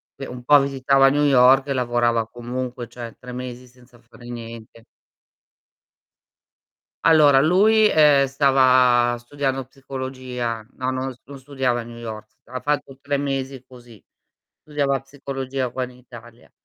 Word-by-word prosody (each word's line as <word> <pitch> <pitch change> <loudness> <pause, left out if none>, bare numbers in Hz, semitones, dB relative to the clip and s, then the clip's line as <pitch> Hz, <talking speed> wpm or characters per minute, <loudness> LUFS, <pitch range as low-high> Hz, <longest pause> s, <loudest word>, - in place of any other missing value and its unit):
che 135 - -7
un 125 0 -9
po' 145 +4 +6
visitava 135 0 +3
New 145 +2 +1
York 135 -1 +5
e 140 - +1
lavorava 120 -2 0
comunque, 120 0 -6
cioè, 120 -2 -9
3 125 - -10
mesi 125 0 -7
senza 125 0 -21
fare 120 0 -15
niente. 115 -1 -10 2.2
Allora 150 -4 +6
lui, 210 +8 +4
ehm, 145 -3 +5
stava 130 -3 +3
studiando 135 +2 -3
psicologia. 130 -3 -6
No, 130 0 -3
non 130 +1 -3
s 125 - -22
non 140 +1 -11
studiava 130 -3 -2
a - - -6
New 115 0 -11
York, 110 -2 -8 0.2
ha 130 - -7
fatto 145 -2 -2
3 140 0 -2
mesi 135 -2 -4
così. 120 -4 -16 0.6
Studiava 140 -3 -1
psicologia 135 -1 -5
qua 130 +2 -4
in 125 - -7
Italia. 120 -2 -15
130 Hz, 140 wpm, -22 LUFS, 120-135 Hz, 2.2 s, po